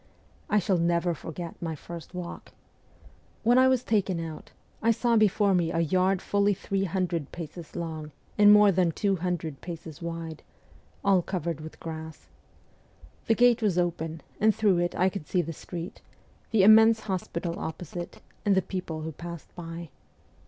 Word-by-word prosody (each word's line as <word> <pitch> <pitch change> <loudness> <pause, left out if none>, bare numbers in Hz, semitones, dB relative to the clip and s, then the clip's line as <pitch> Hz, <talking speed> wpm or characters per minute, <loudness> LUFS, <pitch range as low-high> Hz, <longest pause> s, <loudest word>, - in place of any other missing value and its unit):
I 210 - +3
shall 190 -2 +2
never 170 +1 +1
forget 165 +1 -7
my 165 -2 -3
first 170 +3 -9
walk. 180 -1 -7 0.9
"When 240 +3 +5
I 260 - +6
was 260 -1 +2
taken 200 -7 +1
out, 160 -2 -7 0.3
I 230 - +2
saw 235 +1 +2
before 205 -2 +4
me 170 -3 +2
a 165 -1 +1
yard 185 +3 +2
fully 205 0 +2
three 195 +1 -1
hundred 175 -4 -2
paces 170 -1 -8
long 160 -3 -5 0.2
and 205 0 +7
more 210 -1 +7
than 180 -2 +2
two 195 +1 +1
hundred 165 -4 -3
paces 165 -3 -8
wide, 165 -2 -5 0.6
all 195 -2 +4
covered 170 -4 -3
with 155 0 -10
grass. 160 -1 -8 1.0
The 225 - +4
gate 245 0 +4
was 200 -5 +1
open, 165 -2 -1 0.2
and 215 0 +4
through 200 -5 +3
it 175 0 -1
I 185 - +3
could 190 -5 -4
see 180 -2 +1
the 165 +1 -5
street, 170 +3 -7 0.5
the 220 -4 +4
immense 220 +2 +7
hospital 175 -4 -3
opposite, 170 +2 -6 0.2
and 205 -2 +3
the 190 - +2
people 180 -4 -4
who 160 +1 -4
passed 170 +1 -9
by. 165 -1 -7
175 Hz, 165 wpm, -27 LUFS, 165-200 Hz, 1.0 s, and